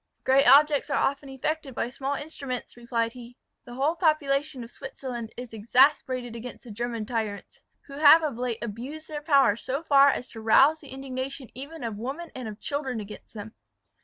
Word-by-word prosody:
"Great 270 +1 +4
objects 295 +1 +6
are 280 - +1
often 280 0 0
effected 270 0 -3
by - - -1
small 270 +3 -3
instruments," 275 -4 -6
replied 235 -1 -1
he. 245 0 -12 0.3
"The 240 - -10
whole 285 +6 +1
population 295 -5 +1
of 230 - -11
Switzerland 245 -4 -7
is 245 -2 -8
exasperated 250 +1 +2
against 235 +2 -8
the 240 - -10
German 230 0 -3
tyrants, 215 -3 -4 0.3
who 280 0 -9
have 315 +2 +8
of 295 -6 -1
late 240 -1 -3
abused 255 +8 -6
their 300 -1 -5
power 280 -8 +4
so 270 +6 -4
far 280 -3 +6
as 255 -2 -2
to 225 - -9
rouse 270 +8 +5
the 290 - -14
indignation 265 0 -6
even 285 +5 -8
of 225 -3 -4
women 280 +9 -5
and 255 -3 -6
of 215 0 -8
children 270 -5 -3
against 210 +2 -10
them. 215 +1 -8
260 Hz, 185 wpm, -27 LUFS, 235-285 Hz, 0.3 s, have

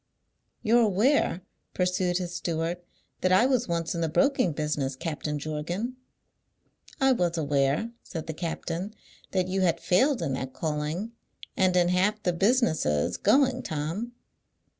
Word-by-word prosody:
"You're 235 +1 +4
aware," 215 - +2 0.3
pursued 180 -1 +1
his 175 -1 -4
steward, 170 0 -2 0.4
"that 185 - +1
I 190 +6 +5
was 255 -2 +1
once 170 -1 -1
in 170 - -3
the 165 - 0
broking 265 - +2
business, 150 -3 -2
Captain 150 0 -3
Jorgan?" 160 - -3 1.0
"I 270 -1 +4
was 175 -8 +1
aware," 145 +7 +1
said 165 -3 -6
the 160 - -4
captain, 175 +4 -4 0.3
"that 185 -2 0
you 190 +1 -1
had 170 -2 +2
failed 240 - +2
in 140 -5 -1
that 130 0 -4
calling, 155 +7 -3 0.4
and 185 -1 +2
in 175 -1 +4
half 205 +4 +1
the 180 - +1
businesses 170 - +2
going, 260 -2 +3
Tom." 165 +11 -4
180 Hz, 140 wpm, -27 LUFS, 155-215 Hz, 1.0 s, I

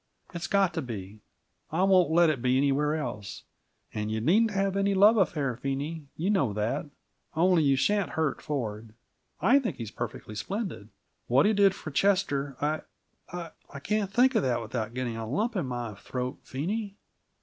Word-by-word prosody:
It's 170 -1 -4
got 195 -3 +2
to 165 - -2
be; 105 -5 -7 0.5
I 170 +4 +1
won't 185 -3 +5
let 165 0 +5
it 135 -6 -4
be 130 +1 +2
anywhere 145 +2 +2
else. 105 -10 -5 0.5
And 105 0 -2
you 110 0 -1
needn't 200 - +3
have 195 -1 0
any 200 0 +2
love 205 +4 +7
affair, 150 - +1
Phene 140 +3 -3
you 180 +6 0
know 140 - +1
that. 105 - -1 0.5
Only 175 +1 +4
you 140 -2 +4
shan't 205 +7 +1
hurt 160 -3 0
Ford. 110 -6 -4 0.5
I 275 +4 +5
think 250 -5 -3
he's 115 -3 -6
perfectly 110 -2 -6
splendid! 140 - -4 0.4
What 130 +4 +4
he 215 - +4
did 200 -2 +4
for 155 - -7
Chester 145 -6 +1
I 155 +1 0 0.9
I 140 - -8
can't 210 +4 -1
think 255 +4 +4
of 220 - +3
that 125 -5 +1
without 115 0 -4
getting 125 -3 -2
a 110 -1 -5
lump 215 - -1
in 175 -9 -1
my 120 -3 -4
throat, 125 +5 -5
Phene. 200 +9 -3
150 Hz, 175 wpm, -28 LUFS, 120-195 Hz, 0.9 s, love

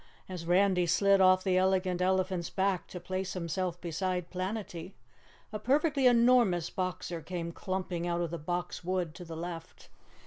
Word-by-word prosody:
As 180 -3 -7
Randy 180 0 +3
slid 195 +3 +4
off 185 0 +5
the 185 -2 +2
Elegant 185 -1 +1
Elephant's 185 -2 0
back 190 -1 0
to 180 - -7
place 185 +1 -3
himself 175 0 -3
beside 180 +1 -3
Planetty, 185 -1 -4 0.6
a 215 - -3
perfectly 280 +1 +2
enormous 235 -8 +4
Boxer 180 -2 -3
came 170 +1 -4
clumping 180 -1 -3
out 170 0 0
of 170 -2 -2
the 170 - -4
Box 175 +3 -4
Wood 180 -3 -1
to 180 - -9
the 165 -2 -8
left. 165 -1 -7
185 Hz, 160 wpm, -30 LUFS, 175-190 Hz, 0.6 s, off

